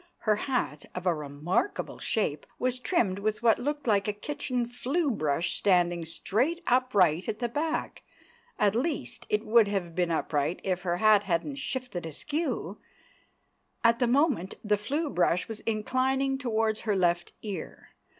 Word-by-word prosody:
Her 215 -1 +3
hat—of 185 - -3
a 180 - +4
remarkable 150 - -2
shape—was 230 - -1
trimmed 225 - +1
with 215 +2 -2
what 230 -2 +5
looked 290 +2 -2
like 205 -4 +2
a 210 - 0
kitchen 250 +1 -2
flue 275 +6 0
brush 155 -3 0
standing 175 -3 +2
straight 255 - -1
upright 200 - +3
at 215 - -2
the 240 - -1
back; 310 +6 -2 0.6
at 205 -2 +3
least, 280 +8 -2
it 425 -1 0
would 225 -1 +5
have 190 -4 -2
been 175 0 0
upright 160 -1 0
if 185 -2 -1
her 175 -1 -1
hat 210 0 +5
hadn't 195 - -1
shifted 255 -10 -4
askew; 300 - -3 1.0
at 230 0 +4
the 245 - +3
moment 255 - +2
the 210 -1 +3
flue 285 +10 -2
brush 180 -7 +1
was 225 -1 -5
inclining 260 +5 +1
towards 220 -4 0
her 210 -3 0
left 175 -2 +1
ear. 200 -6 -6
215 Hz, 150 wpm, -28 LUFS, 180-255 Hz, 1.0 s, what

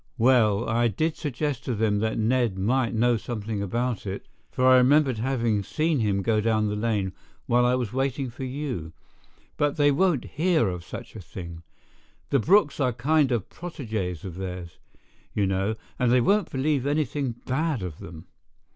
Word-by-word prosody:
"Well, 115 -4 +3
I 115 +1 +2
did 155 - -1
suggest 145 -3 -3
to 125 - -1
them 105 -1 +1
that 110 +1 -1
Ned 115 -2 +1
might 115 +4 +1
know 120 +1 +3
something 110 -2 -4
about 120 +2 -2
it, 95 +1 -5 0.2
for 130 - 0
I 130 0 +7
remembered 130 -1 +4
having 115 -4 0
seen 155 - 0
him 100 -3 0
go 110 0 +2
down 110 -1 +1
the 105 - -2
lane 105 -4 -1 0.3
while 120 +1 +3
I 125 - +3
was 125 -4 -3
waiting 135 -1 -1
for 120 - -8
you, 130 - -4 0.6
but 145 -1 +1
they 145 -1 +4
won't 155 -2 +2
hear 160 - +1
of 90 -2 -5
such 115 +7 -9
a - - -7
thing. 85 -2 -9 0.7
The 140 - +4
Brookes 170 - +3
are 130 -3 +2
kind 140 +3 +2
of 115 -5 -1
protégés 110 - -5
of 90 -2 -7
theirs, 90 -3 -6 0.6
you 100 - +2
know, 95 +3 0 0.2
and 125 -1 +3
they 125 - +5
won't 200 - +2
believe 140 0 0
anything 145 -4 -1
bad 140 - -1
of 85 -4 -6
them. 85 0 -10
120 Hz, 175 wpm, -26 LUFS, 105-135 Hz, 0.7 s, I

